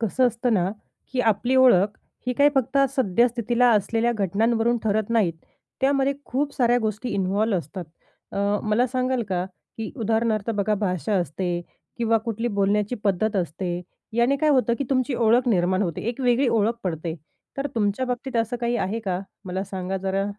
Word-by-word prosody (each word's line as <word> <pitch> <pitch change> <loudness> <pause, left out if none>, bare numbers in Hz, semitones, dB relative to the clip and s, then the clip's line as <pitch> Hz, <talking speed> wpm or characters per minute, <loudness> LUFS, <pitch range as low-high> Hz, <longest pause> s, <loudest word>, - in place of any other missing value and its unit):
कसं 240 +3 +2
असतं 235 +1 -2
ना, 185 -1 +1 0.4
की 255 - +1
आपली 240 +5 0
ओळख 215 -6 +5 0.3
ही 250 - +1
काही 285 +3 +5
फक्त 270 +1 +1 0.2
सद्यस्थितीला 240 +1 +2
असलेल्या 225 +3 +1
घटनांवरून 225 +3 +1
ठरत 215 0 0
नाहीत. 215 -7 +2 0.5
त्यामध्ये 275 0 +2
खूप 280 +3 -1
साऱ्या 245 -1 +3
गोष्टी 220 +1 -2
इन्व्हॉल्व 200 +2 +1
असतात. 175 +4 -7 0.5
अ, - - -3 0.3
मला 225 +4 +3
सांगाल 255 0 0
का, 180 -1 -1 0.3
की 220 -1 -4
उदाहरणार्थ 225 -2 0
बघा 210 -1 +1
भाषा 200 0 -1
असते 180 0 -1 0.5
किंवा 230 -1 +2
कुठली 230 0 -2
बोलण्याची 205 +3 +1
पद्धत 205 +2 +1
असते, 175 0 -2 0.3
याने 240 +4 +3
काय 305 +2 +2
होतं, 255 -4 +3
की 280 - -1
तुमची 255 0 +1
ओळख 235 +2 +3
निर्माण 185 -2 +2
होते, 170 -5 -3
एक 245 +3 -4
वेगळी 250 +1 +3
ओळख 225 0 +2
पडते 165 -2 -3 0.4
तर 275 - -1
तुमच्या 215 +3 0
बाबतीत 250 0 -3
असं 230 +2 0
काही 240 0 0
आहे 215 +2 -2
का? 185 -1 -1 0.2
मला 190 +1 -3
सांगा 190 0 -4
जरा. 190 +1 -1
225 Hz, 165 wpm, -24 LUFS, 195-245 Hz, 0.5 s, ओळख